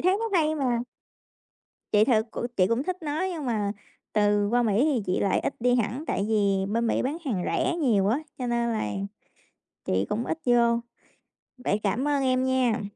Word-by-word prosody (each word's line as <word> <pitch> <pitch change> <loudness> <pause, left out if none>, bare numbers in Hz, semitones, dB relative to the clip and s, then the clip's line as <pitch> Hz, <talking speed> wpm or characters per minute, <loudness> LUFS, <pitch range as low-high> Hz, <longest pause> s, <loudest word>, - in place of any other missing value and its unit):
thấy 370 +3 +3
nó 425 -6 +1
hay 310 0 +2
mà. 245 -5 0 1.1
Chị 210 +1 +5
thật 220 -3 +2
c - - -19 0.2
chị 185 -1 +4
cũng 230 +5 0
thích 365 +3 -3
nó 300 +2 -2
nhưng 320 -4 -5
mà 210 -4 0 0.4
từ 205 -1 +2
qua 245 +2 +2
Mỹ 220 +4 +2
thì 270 -8 +1
chị 180 - 0
lại 195 - +2
ít - - -2
đi 245 +1 +3
hẳn, 245 +5 -1
tại 200 - -1
vì 200 -3 +2
bên 230 +1 +1
Mỹ - - +1
bán 280 +5 -1
hàng 205 -10 -1
rẻ 340 - 0
nhiều 225 - +2
á 245 +6 +2 0.2
cho 250 - -3
nên 235 0 0
là 160 - -1 0.9
chị 95 +1 0
cũng 230 +3 -1
ít 325 - -2
vô, 235 -1 +4 0.8
vậy 215 -4 -1
cảm 240 +8 0
ơn 285 -2 +1
em 255 0 +2
nha. 255 -4 +1
235 Hz, 200 wpm, -26 LUFS, 210-270 Hz, 1.1 s, Chị